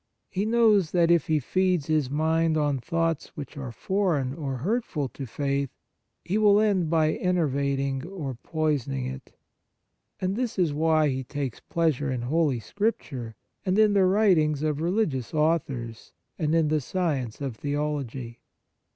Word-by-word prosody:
He 195 Hz, +3 st, -1 dB
knows 220 Hz, -6 st, +4 dB
that, 170 Hz, -1 st, +4 dB
if 170 Hz, -4 st, +3 dB
he 155 Hz, -, +3 dB
feeds 180 Hz, +2 st, +1 dB
his 155 Hz, -4 st, +1 dB
mind 160 Hz, +2 st, +1 dB
on 145 Hz, -3 st, +1 dB
thoughts 165 Hz, +2 st, -1 dB
which 145 Hz, +1 st, -7 dB
are 135 Hz, -4 st, -5 dB
foreign 160 Hz, -, 0 dB
or 140 Hz, -4 st, -4 dB
hurtful 170 Hz, -, -1 dB
to 135 Hz, 0 st, -7 dB
faith, 140 Hz, +2 st, -1 dB, 0.6 s
he 200 Hz, +5 st, 0 dB
will 205 Hz, -1 st, +5 dB
end 195 Hz, -6 st, +2 dB
by 155 Hz, -1 st, +2 dB
ener 180 Hz, -3 st, +1 dB
vating 140 Hz, +1 st, -1 dB
or 150 Hz, -9 st, -4 dB
poisoning 140 Hz, -1 st, -2 dB
it; 130 Hz, 0 st, -7 dB, 0.9 s
and 185 Hz, +1 st, -1 dB
this 245 Hz, -2 st, -2 dB
is 170 Hz, -5 st, +2 dB
why 155 Hz, 0 st, +3 dB
he 130 Hz, 0 st, -2 dB
takes 135 Hz, -2 st, -4 dB
pleasure 155 Hz, -4 st, 0 dB
in 125 Hz, -2 st, -2 dB
Holy 145 Hz, -1 st, +1 dB
Scripture 130 Hz, -, -3 dB, 0.3 s
and 185 Hz, 0 st, +1 dB
in 215 Hz, -1 st, +5 dB
the 195 Hz, -2 st, +4 dB
writings 180 Hz, -7 st, +3 dB
of 155 Hz, -1 st, 0 dB
religious 165 Hz, -, -1 dB
authors, 140 Hz, -8 st, -1 dB, 0.3 s
and 155 Hz, -1 st, +1 dB
in 160 Hz, -2 st, +3 dB
the 155 Hz, -1 st, +1 dB
science 140 Hz, -, -2 dB
of 135 Hz, -6 st, -4 dB
theology. 140 Hz, -5 st, -3 dB
155 Hz, 155 wpm, -26 LUFS, 135-180 Hz, 0.9 s, will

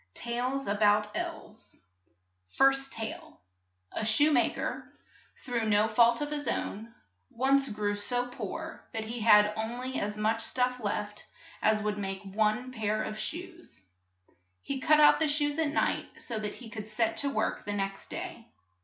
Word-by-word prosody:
TALES 250 Hz, +3 st, -2 dB
ABOUT 210 Hz, +1 st, +3 dB
ELVES -, -, -6 dB, 0.7 s
FIRST 270 Hz, -, +3 dB
TALE 220 Hz, -1 st, -6 dB, 0.5 s
ASHOE 225 Hz, +8 st, +3 dB
MA 250 Hz, -5 st, +4 dB
KER, -, -, -5 dB, 0.5 s
through 235 Hz, -3 st, -1 dB
no 210 Hz, +1 st, +4 dB
fault 235 Hz, +3 st, +4 dB
of 295 Hz, 0 st, -2 dB
his 295 Hz, -1 st, -3 dB
own, 220 Hz, +3 st, -3 dB, 0.4 s
once 270 Hz, +2 st, +2 dB
grew 205 Hz, -1 st, -1 dB
so 245 Hz, +4 st, -1 dB
poor 320 Hz, +6 st, -6 dB
that 220 Hz, -1 st, -2 dB
he 230 Hz, +2 st, -5 dB
had 210 Hz, -1 st, +6 dB
on 220 Hz, +2 st, -3 dB
ly 255 Hz, +1 st, -4 dB
as 210 Hz, +1 st, -3 dB
much 220 Hz, +2 st, +1 dB
stuff 250 Hz, +1 st, 0 dB
left 210 Hz, 0 st, -3 dB, 0.3 s
as 215 Hz, 0 st, +3 dB
would 210 Hz, 0 st, -1 dB
make 195 Hz, -1 st, -4 dB
one 215 Hz, +5 st, 0 dB
pair 215 Hz, -3 st, -1 dB
of 215 Hz, -, -5 dB
shoes. 345 Hz, +1 st, -6 dB, 0.8 s
He 275 Hz, -1 st, -3 dB
cut 305 Hz, +3 st, +4 dB
out 295 Hz, 0 st, +7 dB
the 320 Hz, -, +2 dB
shoes 290 Hz, +1 st, +1 dB
at 315 Hz, -2 st, +2 dB
night 300 Hz, -, -1 dB
so 230 Hz, -2 st, -4 dB
that 210 Hz, -1 st, -4 dB
he 245 Hz, -, -11 dB
could 215 Hz, -2 st, -6 dB
set 220 Hz, +1 st, 0 dB
to 280 Hz, -, +1 dB
work 220 Hz, -5 st, -1 dB
the 205 Hz, -, -2 dB
next 195 Hz, -1 st, -3 dB
day. -, -, -6 dB
225 Hz, 160 wpm, -30 LUFS, 210-270 Hz, 0.8 s, out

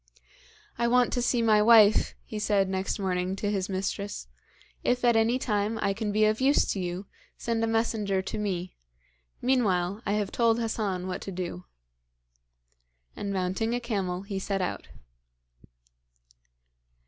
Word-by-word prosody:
'I 235 Hz, -, +2 dB
want 245 Hz, 0 st, +3 dB
to 245 Hz, -, 0 dB
see 240 Hz, -1 st, +1 dB
my 215 Hz, -2 st, +5 dB
wife,' 215 Hz, -1 st, +6 dB
he 215 Hz, -, -5 dB
said 205 Hz, -2 st, +2 dB
next 190 Hz, 0 st, -2 dB
morning 185 Hz, -1 st, -1 dB
to 205 Hz, +1 st, -2 dB
his 195 Hz, -1 st, -2 dB
mistress. 195 Hz, -, -3 dB, 0.6 s
'If 250 Hz, 0 st, +1 dB
at 240 Hz, -1 st, +4 dB
any 225 Hz, +3 st, +3 dB
time 215 Hz, -3 st, -1 dB
I 200 Hz, -, +1 dB
can 210 Hz, 0 st, -3 dB
be 215 Hz, +1 st, +3 dB
of 215 Hz, +3 st, +1 dB
use 275 Hz, +2 st, +4 dB
to 195 Hz, -, -2 dB
you, 180 Hz, +2 st, -4 dB, 0.3 s
send 230 Hz, -1 st, -1 dB
a -, -, +2 dB
messenger 220 Hz, -4 st, 0 dB
to 205 Hz, -, -4 dB
me; 185 Hz, -3 st, -3 dB, 0.7 s
meanwhile, 205 Hz, -6 st, +1 dB
I 205 Hz, -, -1 dB
have 210 Hz, -2 st, -1 dB
told 230 Hz, -1 st, +2 dB
Hassan 210 Hz, -5 st, -2 dB
what 185 Hz, -1 st, -4 dB
to 195 Hz, -, -6 dB
do.' 180 Hz, 0 st, -5 dB, 1.5 s
And 200 Hz, -, -4 dB
mounting 190 Hz, +5 st, -1 dB
a -, -, -1 dB
camel 195 Hz, -6 st, -2 dB
he 200 Hz, -1 st, -4 dB
set 195 Hz, 0 st, -2 dB
out. 180 Hz, -, -3 dB
205 Hz, 155 wpm, -27 LUFS, 190-225 Hz, 1.5 s, wife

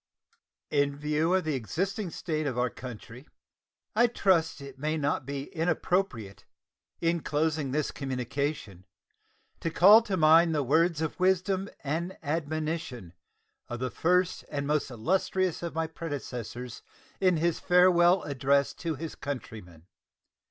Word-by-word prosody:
In 140 Hz, -1 st, +1 dB
view 150 Hz, +4 st, +1 dB
of 190 Hz, -, +1 dB
the 155 Hz, -1 st, -1 dB
existing 185 Hz, -, -2 dB
state 155 Hz, -2 st, -3 dB
of 130 Hz, -3 st, -3 dB
our 125 Hz, -1 st, +1 dB
country, 125 Hz, +2 st, -10 dB, 0.7 s
I 240 Hz, +2 st, +5 dB
trust 185 Hz, -9 st, +1 dB
it 140 Hz, -1 st, -11 dB
may 155 Hz, +2 st, -1 dB
not 145 Hz, -3 st, -1 dB
be 140 Hz, -1 st, -3 dB
inappropriate, 165 Hz, -, -1 dB, 0.6 s
in 170 Hz, 0 st, +1 dB
closing 150 Hz, -1 st, 0 dB
this 150 Hz, +2 st, -1 dB
communication, 130 Hz, -, -4 dB, 0.7 s
to 165 Hz, -, -2 dB
call 200 Hz, +7 st, +7 dB
to 205 Hz, -4 st, -2 dB
mind 160 Hz, +1 st, +5 dB
the 145 Hz, -, +1 dB
words 160 Hz, +4 st, +2 dB
of 160 Hz, -, -4 dB
wisdom 190 Hz, +1 st, +1 dB
and 165 Hz, +6 st, -3 dB
admonition 155 Hz, -, -3 dB, 0.5 s
of 120 Hz, -, -5 dB
the 130 Hz, -1 st, -2 dB
first 180 Hz, +5 st, +1 dB
and 145 Hz, -1 st, -3 dB
most 150 Hz, 0 st, 0 dB
illustrious 180 Hz, -, 0 dB
of 170 Hz, -2 st, -5 dB
my 165 Hz, 0 st, 0 dB
predecessors 125 Hz, -7 st, -6 dB, 0.4 s
in 185 Hz, -3 st, +3 dB
his 170 Hz, +1 st, 0 dB
Farewell 180 Hz, 0 st, +5 dB
Address 140 Hz, 0 st, +1 dB
to 165 Hz, -2 st, -4 dB
his 160 Hz, +3 st, -6 dB
countrymen. 105 Hz, -, -7 dB
155 Hz, 135 wpm, -28 LUFS, 135-175 Hz, 0.7 s, call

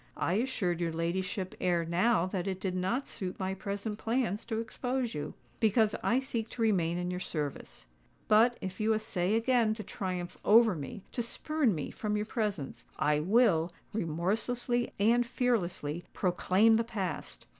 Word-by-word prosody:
"I 175 Hz, -, 0 dB
assured 195 Hz, -6 st, 0 dB
your 170 Hz, -1 st, 0 dB
ladyship 185 Hz, +3 st, -2 dB
ere 175 Hz, -2 st, +2 dB
now 175 Hz, +2 st, +2 dB
that 185 Hz, 0 st, -3 dB
it 190 Hz, -1 st, -2 dB
did 190 Hz, -1 st, -2 dB
not 190 Hz, +9 st, 0 dB
suit 185 Hz, -2 st, -5 dB
my 190 Hz, 0 st, -1 dB
present 200 Hz, +2 st, -4 dB
plans 225 Hz, -3 st, -1 dB
to 225 Hz, -2 st, -2 dB
expose 245 Hz, +2 st, -2 dB
you; 150 Hz, -, -5 dB, 0.2 s
because 220 Hz, -1 st, +3 dB
I 240 Hz, -, +2 dB
seek 235 Hz, -4 st, -2 dB
to 235 Hz, -, -6 dB
remain 175 Hz, -6 st, +2 dB
in 180 Hz, 0 st, -2 dB
your 180 Hz, -, -3 dB
service. 150 Hz, -, -4 dB, 0.4 s
But, 230 Hz, +3 st, +5 dB
if 185 Hz, -1 st, -5 dB
you 220 Hz, +1 st, +3 dB
essay 205 Hz, -2 st, 0 dB
again 230 Hz, -1 st, +3 dB
to 215 Hz, -, -6 dB
triumph 180 Hz, -2 st, -4 dB
over 225 Hz, 0 st, +6 dB
me—to 175 Hz, -, -5 dB
spurn 260 Hz, -, 0 dB
me 150 Hz, -, -4 dB
from 210 Hz, -1 st, -2 dB
your 210 Hz, -, -1 dB
presence—I 185 Hz, -, -1 dB
will, 175 Hz, -2 st, +3 dB, 0.2 s
remorselessly 220 Hz, +7 st, -1 dB
and 235 Hz, +4 st, +4 dB
fearlessly, 190 Hz, -, -1 dB
proclaim 195 Hz, +4 st, +3 dB
the 230 Hz, -, +2 dB
past." 190 Hz, -, -4 dB
205 Hz, 155 wpm, -31 LUFS, 180-230 Hz, 0.4 s, over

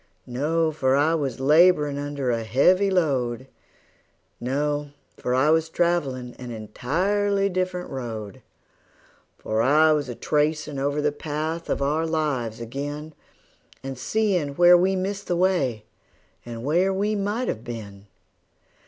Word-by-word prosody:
No 155 Hz, +6 st, 0 dB
for 135 Hz, -3 st, +1 dB
I 150 Hz, +4 st, +3 dB
was 140 Hz, -5 st, -2 dB
laborin' 150 Hz, 0 st, +4 dB
under 145 Hz, -3 st, -2 dB
a 115 Hz, -1 st, -1 dB
heavy 180 Hz, -, +3 dB
load; 130 Hz, -9 st, 0 dB, 0.9 s
No 145 Hz, +3 st, -1 dB, 0.3 s
for 125 Hz, -, -2 dB
I 140 Hz, +4 st, +3 dB
was 160 Hz, 0 st, +2 dB
travelin' 140 Hz, -8 st, -1 dB
an 125 Hz, -1 st, -7 dB
entirely 195 Hz, -, 0 dB
different 185 Hz, -1 st, -2 dB
road; 110 Hz, -6 st, -6 dB, 1.0 s
For 110 Hz, +1 st, -1 dB
I 155 Hz, +6 st, +5 dB
was 145 Hz, -4 st, 0 dB
a 120 Hz, -, -5 dB
tracin' 150 Hz, 0 st, -1 dB
over 145 Hz, +2 st, -1 dB
the 150 Hz, -, +2 dB
path 155 Hz, +3 st, -4 dB
of -, -, 0 dB
our 155 Hz, +4 st, 0 dB
lives 140 Hz, -9 st, -1 dB
ag'in, 145 Hz, +6 st, -6 dB, 0.7 s
And 135 Hz, 0 st, -5 dB
seein' 175 Hz, -, 0 dB
where 175 Hz, +2 st, +7 dB
we 185 Hz, +2 st, +3 dB
missed 195 Hz, +2 st, -3 dB
the 175 Hz, -, 0 dB
way, 140 Hz, -, +1 dB, 0.6 s
and 115 Hz, -1 st, -7 dB
where 175 Hz, +7 st, +2 dB
we 205 Hz, +3 st, 0 dB
might 210 Hz, +5 st, -1 dB
have 110 Hz, -, -3 dB
been. 105 Hz, -4 st, -8 dB
150 Hz, 135 wpm, -24 LUFS, 130-175 Hz, 1.0 s, where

